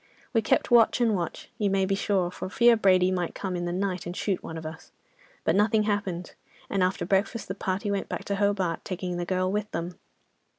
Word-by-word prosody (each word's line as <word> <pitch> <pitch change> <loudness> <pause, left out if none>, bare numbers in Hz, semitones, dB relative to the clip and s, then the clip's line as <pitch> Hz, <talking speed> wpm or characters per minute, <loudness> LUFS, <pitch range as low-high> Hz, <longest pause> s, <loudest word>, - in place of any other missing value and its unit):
We 225 - +3
kept 220 - +1
watch 235 0 +5
and 235 -3 +3
watch, 175 -4 -4
you 205 -2 +2
may 195 0 +2
be 195 - 0
sure, 195 -3 0
for 185 - -6
fear 235 +4 +5
Brady 185 -3 +4
might 180 -2 -2
come 190 -2 -3
in 175 0 -2
the 175 - -2
night, 185 -1 -2
and 175 - -5
shoot 195 -3 -1
one 160 - -7
of 160 - -7
us, 160 +2 -9 0.5
but - - +2
nothing 215 +1 +3
happened, 200 -4 -2 0.4
and 195 - +1
after 185 +1 +1
breakfast 200 +5 0
the 190 - -3
party 195 +2 -2
went 200 -1 -2
back - - -4
to 200 - -1
Hobart, 195 -4 0
taking 180 -1 -4
the 175 - -2
girl 185 +1 0
with 210 +1 -2
them. 170 +2 -5
190 Hz, 220 wpm, -27 LUFS, 180-205 Hz, 0.5 s, watch